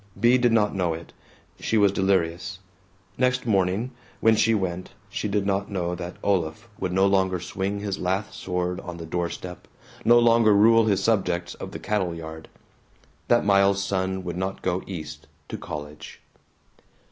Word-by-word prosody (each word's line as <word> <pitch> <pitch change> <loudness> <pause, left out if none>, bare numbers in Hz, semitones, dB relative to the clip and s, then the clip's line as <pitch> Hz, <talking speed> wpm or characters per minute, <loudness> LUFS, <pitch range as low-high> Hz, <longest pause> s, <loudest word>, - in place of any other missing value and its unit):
Bea 120 +4 +5
did 120 -1 +3
not 105 -2 +3
know 90 -4 0
it. 80 - -11 0.5
She 110 - 0
was 100 -2 +5
delirious. 95 -2 0 0.6
Next 125 -1 +1
morning, 100 +3 +1 0.3
when 115 0 +5
she 110 +1 +3
went, 90 -3 -3 0.2
she 105 - -2
did 100 -1 0
not 100 0 0
know 90 -3 -2
that 90 0 -6
Olaf 90 0 0
would 90 - -2
no 95 +1 +3
longer 95 -2 +2
swing 95 +4 -3
his 100 -2 -3
lath 95 +3 -1
sword 90 -1 -2
on 85 -1 -7
the 85 - -7
door 85 +1 -2
step, 90 -1 -8 0.4
no 120 +1 +6
longer 115 -3 +5
rule 115 +2 +6
his 100 -3 +1
subjects 90 -5 0
of - - -8
the - - -6
cattle 95 -5 -1
yard; 80 -1 -8 0.8
that 120 -2 +3
Miles's 100 0 +4
son 95 -1 -1
would 85 -1 -4
not 95 +1 -3
go 90 0 0
East 80 -5 -7 0.2
to - - -4
college. 75 +1 -8
95 Hz, 170 wpm, -25 LUFS, 90-105 Hz, 0.8 s, no